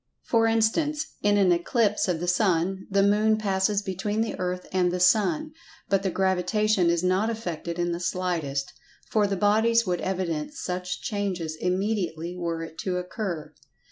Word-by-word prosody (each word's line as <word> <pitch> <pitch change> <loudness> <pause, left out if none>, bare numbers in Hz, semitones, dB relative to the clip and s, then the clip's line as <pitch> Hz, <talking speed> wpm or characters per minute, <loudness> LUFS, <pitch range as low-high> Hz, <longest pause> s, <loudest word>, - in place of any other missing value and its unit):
For 225 -1 +2
instance, 295 +8 +1 0.2
in 205 0 +3
an 190 -3 +4
eclipse 210 +5 +1
of 175 -3 0
the 175 - -3
Sun, 185 0 +1
the 200 0 +3
Moon 210 +2 +3
passes 200 0 0
between 205 +3 -2
the 225 - -1
Earth 180 0 -2
and 180 -1 +2
the 180 - -2
Sun, 230 - +3 0.4
but 195 -1 +2
the 195 - 0
Gravitation 190 +1 +1
is 170 0 +1
not 185 +4 +2
affected 175 -6 -4
in 175 0 0
the 170 - -3
slightest, 175 -7 -2 0.4
for 210 -2 +3
the 195 -1 -2
bodies 220 +4 +3
would 180 -2 -1
evidence 175 -5 -3
such 180 0 -4
change 200 -4 -2
immediately 175 +1 -2
were 170 -2 -3
it 160 0 -10
to 185 -2 -1
occur. 180 -3 -4
190 Hz, 165 wpm, -26 LUFS, 175-210 Hz, 0.4 s, an